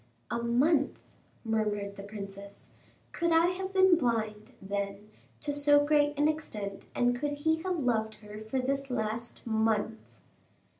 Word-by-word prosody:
"A 235 Hz, -, -1 dB
month!" 270 Hz, +5 st, +2 dB, 0.5 s
murmured 210 Hz, -2 st, -1 dB
the 200 Hz, -, -8 dB
princess; 200 Hz, -1 st, -9 dB, 0.4 s
"could 340 Hz, -1 st, 0 dB
I 330 Hz, +1 st, +5 dB
have 375 Hz, +1 st, -4 dB
been 375 Hz, -3 st, +5 dB
blind, 220 Hz, -4 st, -1 dB
then, 200 Hz, +1 st, -4 dB, 0.3 s
to 290 Hz, -1 st, -2 dB
so 290 Hz, 0 st, +5 dB
great 290 Hz, -1 st, +3 dB
an 295 Hz, +1 st, +4 dB
extent, 210 Hz, -11 st, -3 dB
and 245 Hz, 0 st, +3 dB
could 290 Hz, +3 st, -2 dB
he 320 Hz, +2 st, +1 dB
have 360 Hz, -4 st, -1 dB
loved 220 Hz, -3 st, +1 dB
her 210 Hz, 0 st, -10 dB
for 220 Hz, +4 st, -3 dB
this 275 Hz, +1 st, -1 dB
last 230 Hz, -1 st, -3 dB
month?" 220 Hz, -1 st, +1 dB
235 Hz, 145 wpm, -30 LUFS, 215-290 Hz, 0.5 s, I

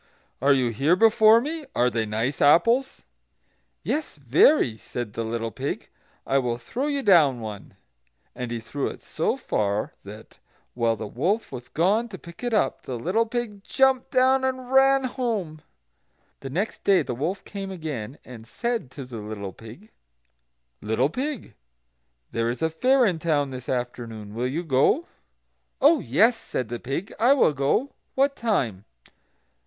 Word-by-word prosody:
are 140 Hz, +2 st, +4 dB
you 130 Hz, -3 st, +3 dB
here 140 Hz, +10 st, +2 dB
before 220 Hz, +2 st, +6 dB
me? 310 Hz, +5 st, -4 dB
Are 120 Hz, -, +3 dB
they 110 Hz, -1 st, -1 dB
nice 115 Hz, +6 st, -2 dB
apples?" 230 Hz, -, +3 dB, 0.8 s
"Yes, 305 Hz, 0 st, -2 dB
very," 140 Hz, -, +4 dB
said 110 Hz, 0 st, -6 dB
the 115 Hz, -, -3 dB
little 115 Hz, 0 st, -3 dB
pig. -, -, -5 dB, 0.4 s
"I 135 Hz, -, +2 dB
will 120 Hz, -2 st, -1 dB
throw 245 Hz, -, -4 dB
you 280 Hz, -2 st, -1 dB
down 155 Hz, -, +5 dB
one." 105 Hz, -3 st, -8 dB, 0.6 s
And 125 Hz, -1 st, -5 dB
he 120 Hz, 0 st, -3 dB
threw 135 Hz, +5 st, -3 dB
it -, -, -8 dB
so -, -, -1 dB
far 105 Hz, 0 st, -1 dB
that, 105 Hz, +2 st, -12 dB, 0.3 s
while 115 Hz, -1 st, +1 dB
the 110 Hz, -, -6 dB
wolf 175 Hz, -, -1 dB
was 125 Hz, -2 st, -8 dB
gone 205 Hz, +8 st, +1 dB
to 195 Hz, -, -8 dB
pick 170 Hz, +5 st, -13 dB
it 245 Hz, -, -1 dB
up, 210 Hz, -11 st, +1 dB
the 125 Hz, -, -5 dB
little 195 Hz, -, 0 dB
pig 220 Hz, -4 st, -4 dB
jumped 265 Hz, +1 st, +2 dB
down 260 Hz, 0 st, +3 dB
and 260 Hz, -1 st, -2 dB
ran 270 Hz, 0 st, +5 dB
home. 220 Hz, -, -3 dB, 0.8 s
The 135 Hz, -, -7 dB
next 190 Hz, +11 st, -3 dB
day 190 Hz, -5 st, +4 dB
the 125 Hz, -, -4 dB
wolf 160 Hz, +11 st, -3 dB
came 195 Hz, -1 st, -6 dB
again, 150 Hz, -, -6 dB
and 115 Hz, -3 st, -11 dB
said 235 Hz, -, -3 dB
to 135 Hz, -, -6 dB
the 125 Hz, -2 st, -8 dB
little 105 Hz, -2 st, -6 dB
pig: 120 Hz, -, -13 dB, 0.9 s
"Little 110 Hz, +7 st, 0 dB
pig, 270 Hz, -, -4 dB, 0.8 s
there 115 Hz, 0 st, 0 dB
is 125 Hz, +6 st, -3 dB
a 160 Hz, -, +1 dB
fair 255 Hz, +9 st, +3 dB
in 180 Hz, -6 st, 0 dB
town 150 Hz, -4 st, 0 dB
this 130 Hz, -1 st, -8 dB
afternoon; 115 Hz, -4 st, -4 dB
will 120 Hz, +3 st, -1 dB
you 155 Hz, +7 st, -3 dB
go?" 160 Hz, -, +2 dB, 0.7 s
"Oh 300 Hz, +4 st, +5 dB
yes," 205 Hz, -, +3 dB
said 125 Hz, -, -4 dB
the 120 Hz, 0 st, -4 dB
pig, 140 Hz, -, -4 dB
"I 245 Hz, +4 st, +6 dB
will 255 Hz, -, +3 dB
go; 145 Hz, -, 0 dB, 0.2 s
what 275 Hz, +1 st, +2 dB
time?" 130 Hz, -, -1 dB
155 Hz, 165 wpm, -25 LUFS, -, 0.9 s, before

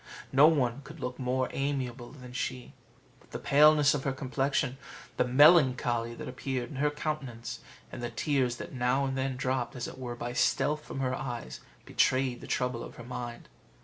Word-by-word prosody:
No 140 Hz, +3 st, +7 dB
one 140 Hz, -5 st, +1 dB
could 150 Hz, +4 st, -12 dB
look 125 Hz, 0 st, -5 dB
more 130 Hz, 0 st, 0 dB
amiable 130 Hz, -3 st, -3 dB
than 125 Hz, -4 st, -11 dB
she; 130 Hz, -1 st, -4 dB, 0.5 s
but -, -, -24 dB
the -, -, -5 dB
paleness 150 Hz, 0 st, +5 dB
of 145 Hz, -2 st, -2 dB
her 135 Hz, -, 0 dB
complexion, 135 Hz, 0 st, -1 dB, 0.4 s
the -, -, +4 dB
melancholy 125 Hz, -4 st, +4 dB
that -, -, -7 dB
appeared 125 Hz, -1 st, -4 dB
in 140 Hz, -, -7 dB
her 150 Hz, +2 st, +2 dB
countenance, 145 Hz, -6 st, -4 dB, 0.3 s
and -, -, -7 dB
the 120 Hz, -, -3 dB
tears 130 Hz, -1 st, 0 dB
that -, -, -8 dB
now 130 Hz, +2 st, +1 dB
and 135 Hz, 0 st, -2 dB
then 130 Hz, 0 st, -1 dB
dropped, 130 Hz, 0 st, -1 dB
as 125 Hz, -, -4 dB
it -, -, -9 dB
were 120 Hz, -2 st, -5 dB
by 120 Hz, +1 st, -5 dB
stealth, 150 Hz, +4 st, +1 dB
from 135 Hz, -, -5 dB
her 130 Hz, -1 st, 0 dB
eyes, 120 Hz, -, -5 dB, 0.3 s
betrayed 130 Hz, -1 st, +1 dB
the -, -, -9 dB
trouble 125 Hz, -2 st, -1 dB
of -, -, -10 dB
her 120 Hz, -, -9 dB
mind. 120 Hz, -1 st, -6 dB
130 Hz, 185 wpm, -30 LUFS, 125-140 Hz, 0.5 s, No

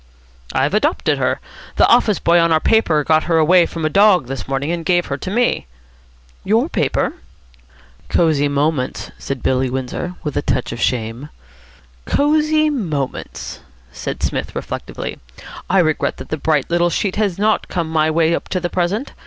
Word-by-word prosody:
"I've 135 Hz, +6 st, 0 dB
adopted 290 Hz, -, +1 dB
her. -, -, 0 dB, 0.4 s
The -, -, +5 dB
office 230 Hz, -4 st, +4 dB
boy 170 Hz, +1 st, +3 dB
on 170 Hz, 0 st, +3 dB
our 160 Hz, -, +4 dB
paper 160 Hz, -7 st, +2 dB
got 155 Hz, +1 st, +2 dB
her 165 Hz, -1 st, +2 dB
away 170 Hz, +2 st, +5 dB
from 165 Hz, -2 st, -4 dB
a -, -, +2 dB
dog 195 Hz, -6 st, +5 dB
this 135 Hz, +1 st, -6 dB
morning, 135 Hz, +3 st, -1 dB
and 170 Hz, -1 st, -3 dB
gave 175 Hz, 0 st, +2 dB
her 140 Hz, -, -3 dB
to 185 Hz, -, -6 dB
me." 235 Hz, -, 0 dB, 0.8 s
"Your 230 Hz, -, +2 dB
paper?" -, -, 0 dB, 1.0 s
"Cosy 155 Hz, -4 st, +2 dB
Moments," 145 Hz, -2 st, -1 dB
said 135 Hz, -3 st, -5 dB
Billy 130 Hz, 0 st, +1 dB
Windsor, 130 Hz, +7 st, -4 dB
with 150 Hz, -, -4 dB
a -, -, +1 dB
touch 125 Hz, -, -1 dB
of 115 Hz, -, -6 dB
shame. 120 Hz, +3 st, -2 dB, 0.8 s
"Cosy 305 Hz, +1 st, +2 dB
Moments?" 155 Hz, -, -4 dB, 0.3 s
said -, -, -6 dB
Psmith -, -, -2 dB
reflectively. -, -, -5 dB, 0.5 s
"I 190 Hz, -, +3 dB
regret 155 Hz, -4 st, +1 dB
that -, -, -9 dB
the 155 Hz, -, -2 dB
bright 150 Hz, -1 st, +1 dB
little 175 Hz, 0 st, +3 dB
sheet 190 Hz, +3 st, -1 dB
has 205 Hz, -5 st, 0 dB
not 215 Hz, +2 st, +1 dB
come 170 Hz, -3 st, -2 dB
my 160 Hz, -1 st, +1 dB
way 165 Hz, +1 st, +2 dB
up -, -, -3 dB
to 185 Hz, -, -1 dB
the 175 Hz, -1 st, -3 dB
present. 185 Hz, +8 st, -1 dB
165 Hz, 170 wpm, -19 LUFS, 145-195 Hz, 1.0 s, The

